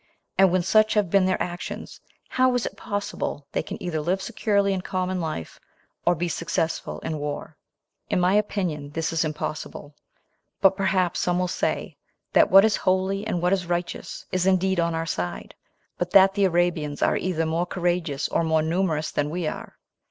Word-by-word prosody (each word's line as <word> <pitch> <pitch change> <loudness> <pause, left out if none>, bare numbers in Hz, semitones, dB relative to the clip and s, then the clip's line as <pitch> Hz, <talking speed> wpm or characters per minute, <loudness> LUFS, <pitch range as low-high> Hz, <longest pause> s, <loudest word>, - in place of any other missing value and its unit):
And 195 0 +6
when 185 -1 +2
such 215 +4 +4
have 205 -5 +1
been 195 -2 +4
their 185 - +1
actions, 175 0 -5 0.3
how 255 -1 +3
is 245 - 0
it - - -5
possible 205 -8 -4
they - - 0
can - - -7
either 165 -4 -2
live 180 +5 0
securely 200 -2 +1
in 185 - -2
common 185 0 -2
life, 155 - -5 0.5
or 175 - +5
be 175 +2 -2
successful 165 -1 -2
in 155 -1 -3
war? 145 0 -5 0.5
In - - +1
my 180 +1 +3
opinion, 185 -8 -1
this 165 0 -2
is 165 +1 +2
impossible; 155 -1 -5 0.7
but 195 -1 +5
perhaps 185 -2 +1
some 175 0 +1
will 180 0 +1
say, - - -2 0.4
that - - +5
what 195 +2 +8
is 220 - +2
holy, 190 +2 0
and 175 -5 -2
what 180 +2 +3
is 185 -3 -1
righteous, 175 0 -4
is 185 0 +1
indeed 190 -1 +2
on 170 -1 +1
our 165 0 -2
side, 90 - -4 0.5
but 175 - -1
that 195 +1 +6
the 200 -1 +2
Arabians 170 -5 0
are - - +3
either 165 -3 -1
more 165 +2 0
courageous 175 -5 -1
or - - 0
more 160 -1 +2
numerous 160 -2 0
than 145 0 -1
we 175 +2 -3
are. 155 - -5
180 Hz, 185 wpm, -25 LUFS, 165-190 Hz, 0.7 s, what